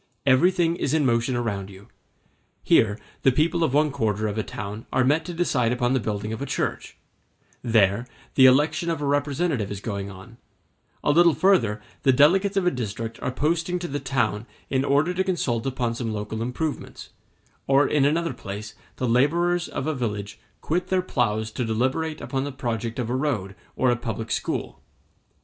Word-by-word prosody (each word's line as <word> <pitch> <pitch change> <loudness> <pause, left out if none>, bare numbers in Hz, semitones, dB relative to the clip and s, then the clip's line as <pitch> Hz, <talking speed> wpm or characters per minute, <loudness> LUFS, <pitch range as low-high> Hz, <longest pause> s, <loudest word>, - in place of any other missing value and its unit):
Everything 165 +5 +3
is 145 -2 0
in 150 -3 +2
motion 120 +1 +1
around 100 -5 -2
you; 100 +1 -14 0.8
here, 105 -1 +4 0.2
the 135 - +5
people 165 +5 +1
of 155 - +1
one 150 +2 +3
quarter 110 -6 -1
of 105 - -3
a 110 - 0
town 105 +1 -7
are 130 - +2
met 150 +5 +2
to 175 - -5
decide 140 -9 +1
upon 125 0 +1
the 130 - +2
building 105 0 -3
of 110 - -6
a - - -2
church; - - -3 0.6
there, 110 -1 +2 0.3
the 130 -1 +7
election 150 +6 +3
of 165 - -1
a 145 - -2
representative 140 - 0
is 100 - -5
going 100 -1 -4
on; 100 +5 -12 0.7
a - - +3
little 170 0 +5
further 125 - +2 0.2
the 135 - +4
delegates 190 +9 +4
of 190 - +2
a 180 - +4
district 115 -1 -5
are - - -1
posting 165 +6 0
to 175 0 -4
the 145 -1 -3
town 120 -5 -1 0.2
in 135 0 +2
order 145 +5 +2
to 190 +1 +1
consult 135 -11 -1
upon 125 -3 -1
some 115 -1 -3
local 105 +1 -4
improvements; 135 +6 -4 0.6
or 140 +1 +4
in 145 -2 +2
another 165 +4 +1
place 105 +2 -7 0.2
the 125 - -2
laborers 170 +8 +2
of - - -4
a 155 - 0
village 105 -6 -4 0.2
quit 175 +3 -1
their 185 -1 +1
ploughs 110 -8 -1
to 125 - -3
deliberate 130 +8 -1
upon 135 -1 -2
the 145 - -4
project 120 -4 -3
of 125 -3 -2
a 125 - -1
road 125 -9 -1 0.2
or 130 -1 +3
a - - +2
public 115 -2 -5
school. - - -3
130 Hz, 185 wpm, -24 LUFS, 110-155 Hz, 0.8 s, the